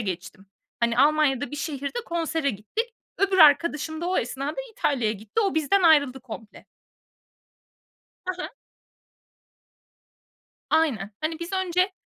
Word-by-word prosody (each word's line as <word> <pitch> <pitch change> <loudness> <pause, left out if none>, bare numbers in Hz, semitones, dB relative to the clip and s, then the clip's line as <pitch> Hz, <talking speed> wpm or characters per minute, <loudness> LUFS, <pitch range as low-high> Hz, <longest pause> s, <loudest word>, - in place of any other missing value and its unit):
geçtim. 190 -1 -6 0.3
Hani, 235 0 +1
Almanya'da 285 -1 +3
bir 295 - -5
şehirde 285 - -4
konsere 325 -3 -1
gittik. 430 - -4 0.2
Öbür 390 -1 +2
arkadaşım 315 0 +4
da 345 - -2
o 370 - 0
esnada 275 +5 -3 0.2
İtalya'ya 245 - 0
gitti. 215 - -3
O, 395 -3 +1
bizden 320 +5 +2
ayrıldı 285 -6 +4
komple. 225 -3 -10 1.6
Hı 365 0 -3
hı. - - -3 2.2
Aynen. 260 - +1
Hani, 320 +1 -2
biz 340 +3 -6
önce 370 0 +1
300 Hz, 120 wpm, -25 LUFS, 250-340 Hz, 2.2 s, arkadaşım